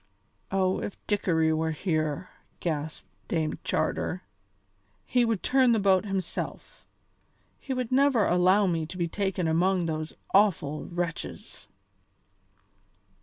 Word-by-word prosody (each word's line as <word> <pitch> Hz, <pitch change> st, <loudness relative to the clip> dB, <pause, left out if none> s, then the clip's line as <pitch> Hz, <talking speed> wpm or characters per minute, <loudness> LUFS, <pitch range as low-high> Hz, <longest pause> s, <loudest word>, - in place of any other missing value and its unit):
"Oh! 190 Hz, -1 st, +1 dB
if 205 Hz, -, -5 dB
Dickory 165 Hz, -6 st, +2 dB
were 160 Hz, +1 st, 0 dB
here," 155 Hz, 0 st, -1 dB, 0.3 s
gasped 155 Hz, -2 st, -3 dB, 0.2 s
Dame 160 Hz, -3 st, -1 dB
Charter, 90 Hz, -, -1 dB, 0.8 s
"he 250 Hz, -1 st, +2 dB
would 225 Hz, -4 st, 0 dB
turn 255 Hz, -2 st, +4 dB
the 225 Hz, -, +2 dB
boat 195 Hz, -1 st, +3 dB
himself; 195 Hz, -3 st, -5 dB, 0.7 s
he 275 Hz, -, -7 dB
would 255 Hz, -2 st, -2 dB
never 265 Hz, -5 st, +4 dB
allow 185 Hz, +3 st, +4 dB
me 165 Hz, -4 st, 0 dB
to 180 Hz, -, -8 dB
be 170 Hz, -2 st, 0 dB
taken 190 Hz, -1 st, -1 dB
among 175 Hz, +2 st, +2 dB
those 155 Hz, -1 st, -3 dB, 0.2 s
awful 175 Hz, -7 st, +3 dB
wretches." 175 Hz, -2 st, -5 dB
185 Hz, 120 wpm, -27 LUFS, 160-205 Hz, 0.8 s, turn